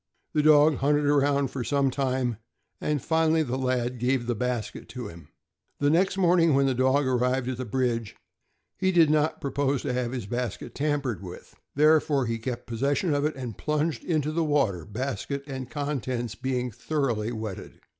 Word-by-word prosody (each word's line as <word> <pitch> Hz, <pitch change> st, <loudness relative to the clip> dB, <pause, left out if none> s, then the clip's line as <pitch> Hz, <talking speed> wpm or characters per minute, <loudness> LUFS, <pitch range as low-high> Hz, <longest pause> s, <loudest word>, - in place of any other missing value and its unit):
The 150 Hz, -, +3 dB
dog 150 Hz, -1 st, +6 dB
hunted 145 Hz, +1 st, +2 dB
around 140 Hz, -1 st, +2 dB
for 130 Hz, -, -3 dB
some 140 Hz, +1 st, +1 dB
time, 130 Hz, -4 st, -1 dB, 0.4 s
and 150 Hz, -3 st, -1 dB
finally 160 Hz, 0 st, +2 dB
the 130 Hz, -3 st, -3 dB
lad 125 Hz, -2 st, -1 dB
gave 125 Hz, 0 st, +1 dB
the 120 Hz, -, 0 dB
basket 120 Hz, 0 st, -3 dB
to 125 Hz, -1 st, -6 dB
him. 85 Hz, 0 st, -13 dB, 0.5 s
The 145 Hz, 0 st, +2 dB
next 185 Hz, +4 st, +2 dB
morning, 170 Hz, -4 st, +4 dB
when 140 Hz, 0 st, +4 dB
the 135 Hz, -, +2 dB
dog 130 Hz, +3 st, +2 dB
arrived 125 Hz, 0 st, +1 dB
at 130 Hz, -, -3 dB
the 130 Hz, -, -4 dB
bridge, 115 Hz, -2 st, -1 dB, 0.6 s
he 190 Hz, -1 st, +1 dB
did 165 Hz, -4 st, +5 dB
not 155 Hz, 0 st, +1 dB
propose 140 Hz, -1 st, -1 dB
to 130 Hz, -, -1 dB
have 125 Hz, -1 st, -1 dB
his 125 Hz, -5 st, -4 dB
basket 120 Hz, 0 st, -4 dB
tampered 140 Hz, -7 st, -1 dB
with, 90 Hz, -2 st, -10 dB, 0.2 s
therefore 150 Hz, -2 st, +4 dB
he 115 Hz, 0 st, -2 dB
kept 120 Hz, +1 st, -4 dB
possession 140 Hz, +7 st, 0 dB
of 145 Hz, 0 st, +1 dB
it 155 Hz, -, -1 dB
and 125 Hz, -5 st, -6 dB
plunged 150 Hz, +1 st, -1 dB
into 155 Hz, -3 st, 0 dB
the 165 Hz, +1 st, 0 dB
water, 135 Hz, -, +1 dB
basket 135 Hz, +5 st, -4 dB
and 130 Hz, -3 st, -6 dB
contents 130 Hz, -6 st, -3 dB
being 125 Hz, +1 st, -2 dB
thoroughly 120 Hz, -3 st, -1 dB
wetted. 110 Hz, -4 st, -6 dB
135 Hz, 175 wpm, -26 LUFS, 125-150 Hz, 0.6 s, dog